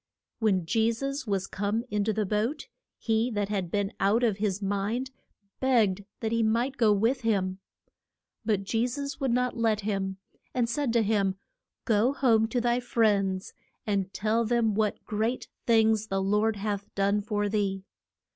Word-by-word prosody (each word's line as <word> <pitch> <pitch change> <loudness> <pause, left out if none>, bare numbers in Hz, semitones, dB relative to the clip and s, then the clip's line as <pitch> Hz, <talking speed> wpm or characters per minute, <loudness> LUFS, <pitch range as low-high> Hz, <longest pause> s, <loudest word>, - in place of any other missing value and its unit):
When 195 -6 +2
Je 225 +5 +2
sus 275 +3 -4
was 195 -2 0
come 205 +4 -2
in 210 -1 +1
to 220 - +2
the 215 0 -1
boat, 215 +9 -1 0.3
he 225 +1 +1
that 205 -1 -1
had 195 -4 -2
been 200 +2 -1
out 215 +5 +3
of 220 -5 +2
his 205 -2 -1
mind 205 +6 -2 0.5
begged 215 -7 +2 0.2
that 220 - -1
he 230 0 +2
might 235 +5 +1
go 225 -4 +4
with 225 +6 +2
him. 195 -4 0 0.8
But 210 -3 0
Je 225 +4 0
sus 280 +2 -5
would 270 -2 0
not 250 +1 +1
let 220 -2 +1
him, 195 -2 -2 0.4
and 245 -2 +2
said 255 +2 -1
to 235 -1 +3
him, 200 -3 +1 0.5
Go 230 +3 +3
home 230 -5 +3
to 245 +2 -1
thy 240 +1 +1
friends, 205 -6 +1 0.3
and 200 -3 -1
tell 220 +4 +1
them 230 -1 +1
what 210 0 -1
great 220 +4 -2 0.2
things 220 -2 +3
the 195 -1 -1
Lord 210 +3 +1
hath 205 0 -3
done 200 +1 +2
for 205 -1 -1
thee. 200 -2 -1
215 Hz, 170 wpm, -28 LUFS, 200-235 Hz, 0.8 s, go